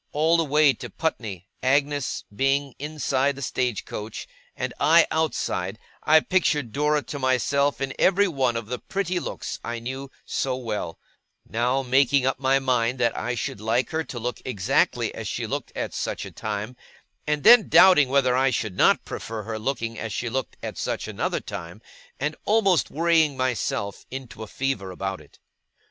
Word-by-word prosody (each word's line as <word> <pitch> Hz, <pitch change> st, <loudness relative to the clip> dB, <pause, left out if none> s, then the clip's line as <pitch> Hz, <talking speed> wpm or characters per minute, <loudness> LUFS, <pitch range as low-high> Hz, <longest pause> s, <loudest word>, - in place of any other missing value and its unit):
All 160 Hz, +3 st, +3 dB
the 165 Hz, -, +2 dB
way 150 Hz, -1 st, +4 dB
to -, -, -8 dB
Putney, 110 Hz, -, -3 dB
Agnes 140 Hz, +1 st, +1 dB
being 135 Hz, +2 st, +1 dB
inside 140 Hz, -2 st, 0 dB
the 140 Hz, -, -7 dB
stage 125 Hz, -4 st, -1 dB
coach, 105 Hz, +1 st, -6 dB, 0.3 s
and -, -, -3 dB
I 165 Hz, +1 st, +6 dB
outside, 160 Hz, -1 st, -1 dB, 0.2 s
I 155 Hz, +1 st, +5 dB
pictured 150 Hz, -10 st, +1 dB
Dora 150 Hz, +3 st, +1 dB
to 145 Hz, -, -6 dB
myself 140 Hz, +2 st, +1 dB
in 135 Hz, 0 st, -2 dB
every 200 Hz, +2 st, +4 dB
one 130 Hz, -8 st, 0 dB
of 115 Hz, -, -4 dB
the 125 Hz, +3 st, -4 dB
pretty 185 Hz, -2 st, -2 dB
looks -, -, -5 dB
I 120 Hz, 0 st, -3 dB
knew 130 Hz, +4 st, -6 dB, 0.2 s
so 130 Hz, -1 st, -1 dB
well; 105 Hz, -9 st, -4 dB, 0.5 s
now 125 Hz, +4 st, 0 dB
making 135 Hz, +1 st, +3 dB
up 130 Hz, 0 st, 0 dB
my 135 Hz, 0 st, +3 dB
mind 125 Hz, -2 st, +1 dB
that 120 Hz, -1 st, +2 dB
I 125 Hz, -, -2 dB
should 105 Hz, -3 st, -4 dB
like 115 Hz, +3 st, 0 dB
her 160 Hz, 0 st, -1 dB
to 125 Hz, -, -7 dB
look 120 Hz, 0 st, -4 dB
exactly 105 Hz, -8 st, +1 dB
as -, -, -6 dB
she -, -, -3 dB
looked -, -, -4 dB
at -, -, -3 dB
such -, -, -3 dB
a -, -, -9 dB
time, 110 Hz, +3 st, -4 dB, 0.5 s
and 150 Hz, -1 st, 0 dB
then 245 Hz, -, +8 dB
doubting 175 Hz, -6 st, +7 dB
whether 130 Hz, -2 st, +3 dB
I 135 Hz, +1 st, +3 dB
should 110 Hz, -6 st, -2 dB
not -, -, +4 dB
prefer 110 Hz, -1 st, -5 dB
her 110 Hz, +1 st, -5 dB
looking 115 Hz, -1 st, -3 dB
as 115 Hz, -, -4 dB
she 120 Hz, +4 st, -2 dB
looked 130 Hz, +1 st, -3 dB
at -, -, -5 dB
such -, -, -2 dB
another -, -, -2 dB
time; 85 Hz, +4 st, -8 dB, 0.4 s
and 150 Hz, +3 st, -1 dB
almost 200 Hz, -5 st, +3 dB
worrying 160 Hz, -3 st, +2 dB
myself 120 Hz, -5 st, -2 dB
into 130 Hz, -2 st, -8 dB
a 110 Hz, -, -6 dB
fever 130 Hz, -6 st, -2 dB
about 95 Hz, +1 st, -4 dB
it. -, -, -20 dB
130 Hz, 175 wpm, -25 LUFS, 115-150 Hz, 0.5 s, then